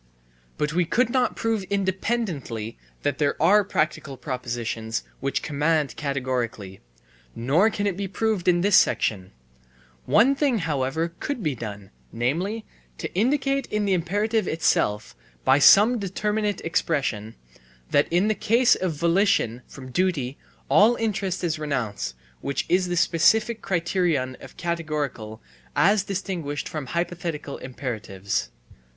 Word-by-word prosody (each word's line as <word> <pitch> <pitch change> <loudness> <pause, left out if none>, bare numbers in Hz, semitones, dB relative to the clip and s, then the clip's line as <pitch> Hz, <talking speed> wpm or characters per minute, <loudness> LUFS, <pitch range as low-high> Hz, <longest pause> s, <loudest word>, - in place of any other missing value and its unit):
But 150 0 -1
we 180 +1 +3
could 235 +8 +1
not 255 -1 +1
prove 225 -2 0
independently 190 - -2 0.3
that 145 -1 -1
there 145 -2 +1
are 205 +6 +5
practical 155 -7 -2
propositions 120 -3 -3 0.2
which 135 +1 -2
command 150 -1 0
categorically, 125 -8 -3 0.5
nor 150 - +3
can 205 -2 -3
it 200 -3 0
be 195 +1 -3
proved 215 -1 -1
in 175 -1 +4
this 200 +1 +4
section; 95 -4 +2 0.8
one 265 +5 +5
thing, 275 -3 +1
however, 160 -1 -1
could 280 -7 -3
be 150 -4 0
done, 105 -5 -8 0.2
namely, 180 - -1 0.3
to - - -5
indicate 275 +6 +1
in 210 -1 -1
the 195 - +2
imperative 205 +5 0
itself, 105 -9 0 0.3
by 135 +2 +5
some 215 - +7
determinate 210 +1 -1
expression, 135 -10 -1 0.6
that 145 - +4
in 175 +5 +2
the 215 - +3
case 235 +4 +3
of 185 -3 -1
volition 170 - +2
from 130 -2 -11
duty 145 -6 0 0.3
all 225 +4 +5
interest 200 -5 -2
is 160 -2 -1
renounced, 110 - -3 0.2
which 140 -1 -2
is 180 +1 +2
the 175 0 -2
specific 215 +7 +3
criterion 165 -7 0
of - - -12
categorical 150 -10 -3 0.3
as 195 +8 +4
distinguished 180 -7 -4
from 150 -4 -5
hypothetical 170 -3 -3
imperatives. 110 -7 -4
165 Hz, 130 wpm, -24 LUFS, 130-200 Hz, 0.8 s, some